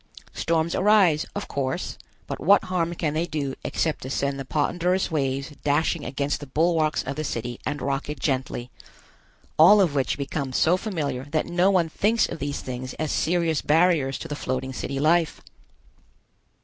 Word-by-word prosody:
Storms 165 0 0
arise, 190 -6 +4
of - - -4
course, 135 -2 -3 0.3
but - - -5
what 200 +3 +5
harm 175 -2 -1
can 155 -3 -1
they 165 +3 -1
do 145 -5 -3
except 160 -2 -1
to 130 - -6
send 140 0 -1
the 135 - -5
ponderous 175 +6 0
waves 135 -1 -1
dashing 150 +2 +1
against 140 +2 -2
the 145 - -9
bulwarks 160 +2 +1
of 135 +2 -4
the 155 - -3
city 120 -3 -4
and 145 -1 -3
rock 140 +1 -2
it 150 -2 -5
gently, 130 -3 -2 0.9
all 195 +7 +8
of 180 -7 +3
which 140 0 0
becomes 140 -2 -3
so 170 +3 +4
familiar 155 - -3
that 150 +2 -1
no 175 +2 +2
one 180 -4 +3
thinks 215 +8 +1
of - - -7
these 145 +1 -3
things 130 0 -6
as 155 -2 -2
serious 165 -2 +1
barriers 155 -4 +3
to - - -7
the 145 - -4
floating 130 -1 -3
city 135 +1 -4
life. 160 +2 +2
150 Hz, 175 wpm, -25 LUFS, 135-170 Hz, 0.9 s, all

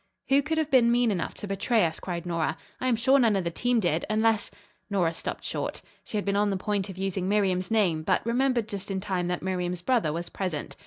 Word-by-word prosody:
"Who 275 +1 +5
could 315 +3 -2
have 310 -2 0
been 240 -3 +5
mean 240 -1 +3
enough 180 -4 -2
to 205 - -7
betray 205 +2 +2
us?" 160 -1 -2
cried 175 -2 -5
Nora. 170 -2 -1 0.2
"I 255 - -1
am 250 - +3
sure 260 +5 +4
none 230 -5 +4
of 190 - 0
the 170 - -2
team 245 +7 +1
did, 175 -5 +1
unless 220 0 +2 0.2
" - - -39
Nora 180 -5 +1
stopped - - -5
short. - - -3 0.2
She 215 - -4
had 205 - -2
been 200 0 0
on 205 0 +2
the 195 - 0
point 200 0 -1
of 190 - -8
using 190 -1 -2
Miriam's 190 -3 +1
name, 190 -8 +2
but 155 - 0
remembered 240 -1 +1
just 200 -1 -5
in 195 -1 -1
time 185 -2 -2
that 180 0 -2
Miriam's 180 -1 -2
brother 230 -9 +2
was 170 +2 -4
present. 180 -6 -4
200 Hz, 245 wpm, -27 LUFS, 180-230 Hz, 0.2 s, Who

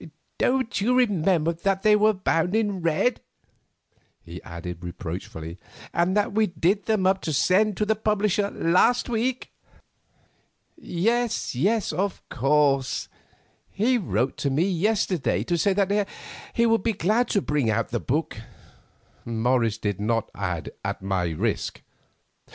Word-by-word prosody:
Don't 255 -4 +1
you 245 +5 +2
remember 180 -8 +2
that 195 +3 -1
they 215 -1 +6
were 215 +1 +4
bound 185 -2 0
in 205 -4 0
red?" 170 +9 +1 1.0
he 85 +1 -9
added 85 0 -8
reproachfully, 85 -1 -7 0.3
"and 180 +4 +1
that 205 -1 +1
we 215 0 +3
did 180 +4 0
them 215 -4 +1
up 190 0 +2
to 160 - -3
send 190 +7 +2
to 210 - +1
the 220 - +2
publisher 210 -1 +1
last 195 +11 +2
week?" 240 +2 -2 1.2
"Yes, 235 - -1
yes, 195 - +1
of 190 +4 -3
course; 135 0 +1 0.6
he 240 +5 +1
wrote 135 - -1
to 140 - -1
me 140 +5 +1
yesterday 190 -3 0
to 175 - -1
say 170 +4 +2
that 200 +1 +1 0.5
he 235 - +3
would 225 -1 +3
be 230 - 0
glad 215 +6 +1
to 205 - +1
bring 150 -9 0
out 110 +1 0
the 120 - -2
book"—Morris 115 -3 -3
did 105 -3 -3
not 115 +1 -1
add, 90 -5 -4
"at - - -4
my 95 -2 0
risk." 80 - -2
185 Hz, 140 wpm, -25 LUFS, 130-215 Hz, 1.2 s, they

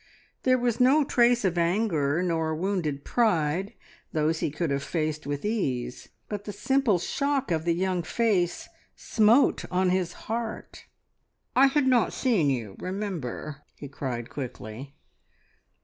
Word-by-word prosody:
There 255 0 +3
was 240 -1 0
no 270 +5 +5
trace 240 -4 +3
of 175 -2 +1
anger, 170 -4 +1
nor 160 -3 0
wounded 160 -5 -2
pride 190 -5 +1 0.4
those 160 +1 +1
he - - 0
could 150 +1 -2
have 140 0 0
faced 155 -1 -2
with 145 +3 -3
ease 130 - -2 0.2
but 205 -1 -5
the 205 - -4
simple 265 -3 +2
shock 275 +7 -1
of 160 -1 0
the 170 -1 +2
young 185 0 0
face 180 -2 0 0.3
smote 230 +5 +3
on 185 0 +2
his 180 -2 0
heart. 225 0 -5 0.7
"I 270 +2 +7
had 275 0 +2
not 255 -3 +3
seen 215 - +2
you, 115 -7 -3
remember!" 175 - -5
he 145 - -8
cried 125 -4 -5
quickly. 130 0 -7
180 Hz, 140 wpm, -27 LUFS, 150-225 Hz, 0.7 s, I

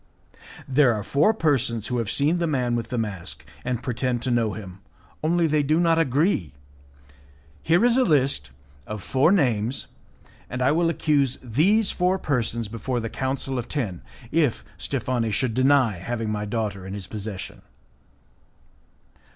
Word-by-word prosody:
"There 130 -3 +4
are 105 - -4
four 145 - +3
persons 130 - 0
who 125 -1 0
have 115 -3 -2
seen 145 +9 +2
the 170 - 0
man 125 -5 0
with 115 - -2
the 125 - -2
mask, 105 -6 -5 0.2
and 125 -1 -2
pretend 125 -1 -1
to 130 - 0
know 115 -3 +1
him, 95 -3 -9 0.4
only 170 +2 +2
they 155 -1 +2
do 155 +3 +2
not 165 -1 +3
agree. 145 - +1 1.1
Here 175 +8 +3
is 245 0 +4
a 260 - +5
list 135 - +1 0.4
of 105 -3 -6
four 135 +6 +3
names, 125 - +1 0.6
and 125 - -4
I 130 - +4
will 165 +2 +2
accuse 145 -5 +1
these 185 - +2
four 180 +1 +1
persons 120 - -1
before 115 +3 -3
the 115 -1 -4
Council 135 0 -2
of 120 - -5
Ten, 110 - -3 0.3
if 150 -7 +1
Steffani 120 -3 -1
should 115 +3 0
deny 130 -5 +3
having 115 +2 -3
my 105 0 -2
daughter 105 -3 -3
in 95 - -5
his 100 -2 -5
possession." 100 -1 -6
125 Hz, 160 wpm, -24 LUFS, 110-150 Hz, 1.1 s, a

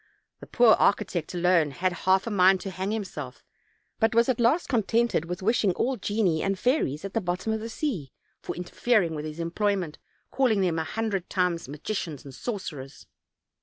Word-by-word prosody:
The - - -11
poor 240 -3 +5
architect 175 -4 +1
alone 175 -3 +3
had 175 +5 -1 0.2
half 190 0 +4
a 230 - -3
mind 190 -1 +5
to 195 - -5
hang 190 +2 -3
himself, 180 -12 -5 0.6
but 225 0 +2
was 235 +2 +4
at 250 - +1
last 245 +9 +3
contented 230 - +1
with 180 +2 -5
wishing 215 -3 +2
all 260 +8 0
genii 205 -6 0
and 195 0 0
fairies 200 - 0
at 195 - -6
the 225 - 0
bottom 180 +4 -2
of 220 - -1
the 225 +1 -6
sea, 220 - -3 0.3
for - - -5
interfering 180 +1 +1
with 150 -1 -5
his 155 +1 -7
employment, 175 -1 -1 0.3
calling 240 -7 +2
them 170 -3 +1
a - - 0
hundred 195 +2 -3
times 180 -5 0
magicians 150 - -5
and 135 - -10
sorcerers. 150 - -6
190 Hz, 180 wpm, -26 LUFS, 170-225 Hz, 0.6 s, poor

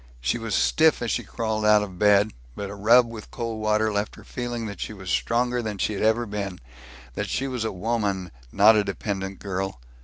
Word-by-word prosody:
She 60 - 0
was 115 -3 -2
stiff 155 -5 +3
as 115 - -1
she - - -1
crawled 110 -2 -2
out 105 0 +5
of 95 -3 -8
bed, 105 +1 +4 0.2
but 100 -1 -5
a - - -6
rub 115 +5 +5
with 115 -2 -9
cold 115 -2 -4
water 110 0 +2
left 105 +1 -2
her - - -14
feeling 120 -2 -4
that 100 -2 -7
she - - -4
was 95 -3 -6
stronger 120 +1 +1
than 110 -3 -4
she 105 - 0
ever 110 +3 +2
had 110 - -9
been; 100 -3 -4 0.5
that - - -3
she 135 - -1
was 125 -4 -3
a 110 - -1
woman, 100 -3 -2 0.2
not 105 +3 +6
a 105 - +3
dependent 95 -2 -4
girl. 95 -6 -4
105 Hz, 215 wpm, -25 LUFS, 100-115 Hz, 0.5 s, not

